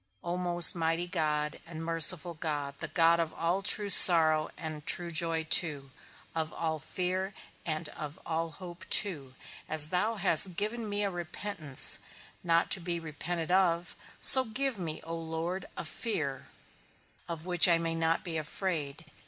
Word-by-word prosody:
O 175 0 -5
most 175 -2 +4
mighty 165 0 -3
God, 150 -4 -4
and 165 -1 -10
merciful 165 +1 +7
God, 150 -3 -6
the - - -6
God 170 0 +1
of 165 -1 -5
all 175 +4 -3
true 205 0 +4
sorrow, 160 -4 +8
and 155 -2 -8
true 175 -1 +3
joy 165 0 +1
too, 150 -4 0 0.4
of 160 -1 -5
all 160 -1 -5
fear, 185 +4 -6 0.3
and 155 0 -5
of 150 +4 -11
all 165 0 -4
hope 175 +2 -13
too, 145 -11 +1 0.3
as 155 -1 +4
thou 210 +6 -3
hast 180 -2 +2
given 215 +3 -6
me 205 0 -4
a 200 - -4
repentance, 175 -4 0 0.4
not 170 -1 -1
to 195 - +1
be 170 -1 -6
repented 165 +2 -7
of, 175 -2 -1 0.2
so 260 - +4
give 255 0 -5
me, 160 -3 -7
O 165 +1 -8
Lord, 165 +3 -7
a - - -6
fear, 155 - -6 0.8
of 165 -1 -7
which 180 -1 +6
I 170 -1 +2
may 165 0 -4
not 165 0 -2
be 165 -3 -5
afraid. 160 -2 -6
165 Hz, 160 wpm, -27 LUFS, 160-180 Hz, 0.8 s, sorrow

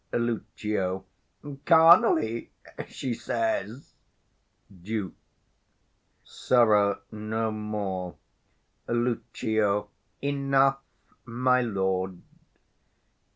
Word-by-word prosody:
Lucio. 105 -5 -2 0.6
Carnally, 165 - +5 0.4
she 130 - -4
says. 115 +1 -3 0.9
Duke. 105 -1 -4 1.1
Sirrah, 105 -5 +2
no 110 +1 -3
more! 105 -4 -4 0.7
Lucio. 110 -3 -1 0.3
Enough, 135 -1 +2 0.4
my 125 +1 +1
lord. 95 -5 -1
110 Hz, 55 wpm, -27 LUFS, 100-125 Hz, 1.1 s, Carnally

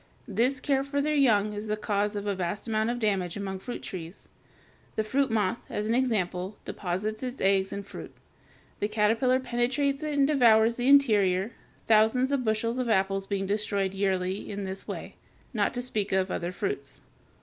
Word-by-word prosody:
This 245 +6 +1
care 270 0 +1
for 280 +1 -2
their 300 +2 +1
young 215 -8 +3
is 210 +1 -5
the 215 0 -1
cause 210 0 -1
of 205 0 -3
a 205 - 0
vast 185 +3 -3
amount 220 0 +1
of 240 - -1
damage 195 -6 0
among 195 -1 -4
fruit 245 +5 -7
trees. 175 -1 -8 0.7
The 220 - +1
fruit 265 +5 +1
moth, 220 0 0
as 210 - -2
an 220 - +1
example, 205 -6 0
deposits 205 +4 -3
its 255 0 -5
eggs 195 0 +2
in 200 - -4
fruit; 200 - -9 0.7
the 205 - 0
caterpillar 225 +4 +2
penetrates 260 +3 0
it 305 -1 -2
and 275 - +5
devours 235 -5 +4
the 245 +1 -1
interior, 210 -8 +4 0.3
thousands 225 +5 +4
of 275 -2 +1
bushels 230 +2 0
of 250 -2 -1
apples 195 -1 +1
being 195 -1 -1
destroyed 200 -1 -1
yearly 190 -1 -1
in 205 0 -4
this 190 0 -6
way, - - -7 0.4
not 210 -3 +1
to 245 - -2
speak 215 -5 -1
of 190 0 +1
other 175 0 -2
fruits. 395 - -4
215 Hz, 180 wpm, -28 LUFS, 195-250 Hz, 0.7 s, and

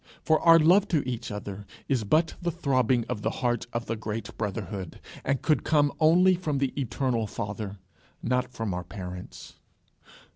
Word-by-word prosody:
For 155 0 +3
our 165 -1 +7
love 180 +6 +5
to 155 -8 0
each 120 -1 -3
other 105 -1 -6 0.2
is 130 -5 +1
but 155 +10 +2
the 175 - 0
throbbing 130 -7 +1
of 120 -4 -3
the - - 0
heart 120 -2 -1
of 115 0 -3
the 115 - -2
great 110 -1 -5
brotherhood, 100 -3 -4 0.2
and 140 -1 -1
could 155 - +2
come 145 -2 +3
only 175 +4 +6
from 160 -5 -1
the 135 -1 0
eternal 125 -4 -1
Father, 100 0 -5 0.5
not 125 +1 0
from 115 -5 -3
our 90 0 -3
parents. 90 -2 -9
125 Hz, 170 wpm, -27 LUFS, 105-155 Hz, 0.5 s, our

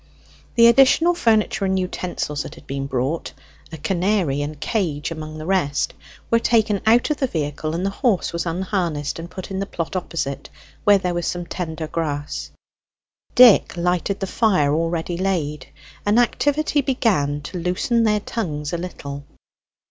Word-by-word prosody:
The 230 - +7
additional 270 +8 +6
furniture 225 - +2
and 190 0 +1
utensils 180 -5 -3
that - - -8
had - - -15
been 135 0 -4
brought 135 +5 -2 0.4
(a 160 - -6
canary 180 -3 0
and 145 0 -5
cage 160 -6 -1
among 155 -1 -6
the 155 - -7
rest) 170 -7 0 0.4
were 230 - +5
taken 220 -4 +2
out 240 +6 +4
of 300 - 0
the 265 - 0
vehicle, 155 - -3
and 180 +3 -2
the 195 - 0
horse 205 -5 0
was 170 +1 -2
unharnessed 170 -4 -2
and 170 +1 -7
put 185 +1 -8
in 190 - -2
the 195 - -2
plot 165 -3 -4
opposite, 165 -6 -3 0.4
where 205 -1 +7
there 180 -2 -2
was 175 -1 -2
some 175 -1 -3
tender 160 -2 -4
grass. 150 -2 -3 0.9
Dick 240 -7 +7
lighted 180 +3 0
the - - 0
fire 185 -9 +2
already 165 +2 -1
laid; 170 -6 -2 0.4
and 205 +2 +2
activity 290 +4 +2
began 205 - +1
to 180 +5 -6
loosen 180 +7 +1
their 210 -1 +2
tongues 150 -11 -4
a 170 - -1
little. 140 -5 -6
180 Hz, 165 wpm, -22 LUFS, 155-210 Hz, 0.9 s, The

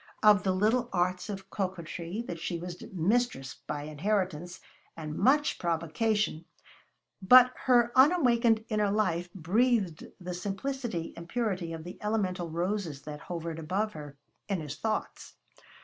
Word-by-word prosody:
Of 210 -1 +7
the 195 -2 +1
little 220 +6 +2
arts 180 +1 0
of 195 -1 -7
coquetry 185 +2 -4
she 170 +1 -3
was 175 +1 -7
mistress 195 - 0
by 145 -1 -3
inheritance 175 +2 -2 0.4
and 155 -2 -5
much 280 - +3
provocation, 170 +2 0 0.8
but 250 +5 +8
her 240 -2 +5
unawakened 245 -7 +4
inner 210 -2 +1
life 180 -4 0
breathed 195 0 +1
the 180 -1 -5
simplicity 200 0 -3
and 170 0 -10
purity 195 -8 -1
of 165 -1 -6
the 175 +2 -9
elemental 190 -5 -1
roses 170 -3 -2
that 150 0 -7
hovered 165 -1 -5
about 190 +7 -1
her 145 -4 -9 0.3
in 195 -3 0
his 150 -3 -6
thoughts. 220 -1 -3
185 Hz, 135 wpm, -29 LUFS, 170-220 Hz, 0.8 s, but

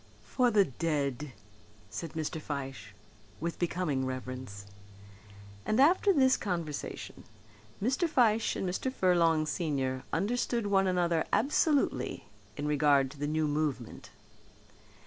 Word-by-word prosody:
"For 250 -2 +2
the 210 -4 +4
dead," 145 -1 -2 0.6
said 110 +10 -6
Mr. 160 -1 -3
Fyshe, 140 -3 -6 0.4
with 170 +1 -4
becoming 170 -6 -1
reverence. 130 -5 -6 1.0
And 215 - 0
after 355 +8 +5
this 265 -7 +4
conversation 170 -7 -5 0.6
Mr. 260 - +1
Fyshe 225 -6 +3
and 190 - -2
Mr. 190 +8 -2
Furlong 170 -7 +3
senior 140 -5 -1
understood 235 +4 0
one 195 -1 +3
another 175 -3 +1
absolutely 290 0 +1 0.3
in 145 0 -2
regard 145 -2 +3
to 145 - -13
the 145 - -1
new 155 0 0
movement. 145 -6 -3
165 Hz, 115 wpm, -30 LUFS, 140-205 Hz, 1.0 s, after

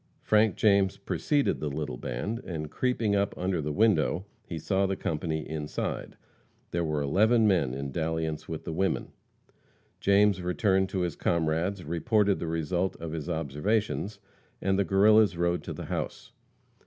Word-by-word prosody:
Frank 105 -2 +3
James 100 -2 +3
preceded 140 +8 0
the 75 - -2
little 70 -2 -4
band, 105 - -3
and, 75 -4 -5
creeping 115 -5 0
up 100 0 0
under 90 -2 -1
the 75 +1 -2
window, 100 -1 +2 0.2
he 85 - -5
saw 95 +4 +1
the 95 - -1
company 80 -2 -3
inside. 75 -1 -4 0.5
There 85 0 0
were 75 -2 -1
eleven 110 - +4
men 80 -11 +2
in 70 0 -4
dalliance 80 +1 -2
with 80 -1 -5
the 80 - -4
women. 95 +3 -1 0.9
James 100 -1 +4
returned 95 +1 +1
to 95 -1 -2
his 85 -3 -1
comrades, 85 +3 0
reported 100 +5 +1
the 85 - -3
result 85 +3 -1
of 80 -1 -6
his 80 -3 -5
observations, 100 - -1 0.4
and 95 0 +1
the 100 - +2
Guerrillas 100 +1 +5
rode 85 0 +1
to - - -5
the - - -7
house. - - -4
90 Hz, 155 wpm, -28 LUFS, 80-100 Hz, 0.9 s, Guerrillas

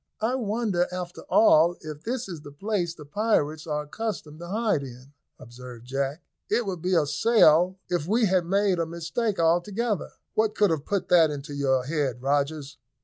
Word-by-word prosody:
"I 225 +3 +1
wonder, 215 -6 0
after 180 -1 -6
all, 170 -5 +5
if 155 -2 -8
this 245 +5 -3
is 170 -5 -7
the 145 - -11
place 175 +1 -2
the 150 - -11
pirates 155 -3 0
are 150 -1 -2
accustomed 155 -3 -5
to 175 - -8
hide 210 -4 0
in," 130 +1 -11 0.2
observed 120 -1 -11
Jack. 135 +4 -3 0.3
"It 230 +2 +1
would 185 -4 -4
be 185 +1 +1
a 160 -3 +3
sell 185 -1 +4
if 175 -3 -2
we 225 +4 +3
had 185 -3 +1
made 195 -1 +2
a 165 - 0
mistake 170 +6 -2
altogether." 190 +6 0 0.2
"What 215 0 +1
could 205 -4 +3
have 155 -3 -2
put 200 -3 -2
that 165 -3 +6
into 145 0 -6
your 135 -2 +1
head, 140 -4 -1
Rogers?" 140 +1 -1
170 Hz, 180 wpm, -26 LUFS, 145-205 Hz, 0.3 s, that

